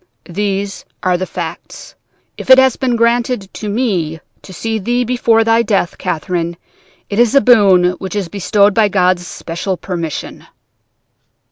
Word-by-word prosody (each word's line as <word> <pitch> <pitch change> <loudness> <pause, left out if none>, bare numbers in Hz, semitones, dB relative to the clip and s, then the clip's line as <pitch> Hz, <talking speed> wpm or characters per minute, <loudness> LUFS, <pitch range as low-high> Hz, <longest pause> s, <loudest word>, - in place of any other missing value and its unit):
These 200 +1 -3 0.2
are 185 -1 +2
the 185 +1 -3
facts. - - -7 0.4
If - - -9
it 260 - +9
has 265 -1 +4
been 255 -3 -1
granted 235 -3 0
to 210 - -5
me 190 -9 -1 0.2
to - - -13
see 220 +4 -3
thee 240 +5 0
before 235 -2 +2
thy 225 +1 +3
death, 200 -5 -1
Catherine, 170 +1 -3 0.5
it 205 - -3
is 240 +1 +3
a - - +8
boon 195 -8 +5
which 190 +1 -6
is 200 -4 -2
bestowed 200 +2 +2
by 215 +1 +3
God's 185 -2 +1
special 180 +3 -4
permission.' 170 -3 -6
200 Hz, 150 wpm, -15 LUFS, 180-230 Hz, 0.5 s, it